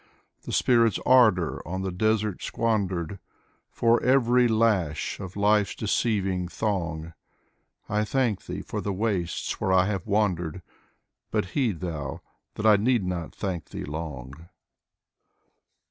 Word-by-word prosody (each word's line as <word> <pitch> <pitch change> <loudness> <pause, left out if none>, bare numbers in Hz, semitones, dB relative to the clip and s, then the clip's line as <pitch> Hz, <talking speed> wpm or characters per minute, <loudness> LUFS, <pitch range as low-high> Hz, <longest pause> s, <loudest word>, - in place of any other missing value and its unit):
The - - -5
spirit's 115 -5 +3
ardor 110 -10 +4
on 95 +3 -3
the 95 - -2
desert 110 +1 0
squandered. 100 -5 -1 0.5
For 115 0 +2
every 125 -1 +4
lash 105 -9 +1
of 95 -2 -7
life's 105 0 +2
deceiving 95 -4 0
thong; 85 -5 -3 0.7
I 105 +1 0
thank 115 -2 -1
Thee - - -5
for - - -4
the 100 - -2
wastes 95 -4 -2
where 95 - +1
I 95 0 +5
have 100 -2 -3
wandered: 90 -5 0 0.7
But - - 0
heed 115 - 0
Thou, 80 -6 -4 0.3
that 105 - -4
I 105 -1 +7
need 115 -1 +1
not 90 -3 -4
thank 90 -6 -3
Thee - - -6
long. 75 0 -7
100 Hz, 130 wpm, -26 LUFS, 85-110 Hz, 0.7 s, I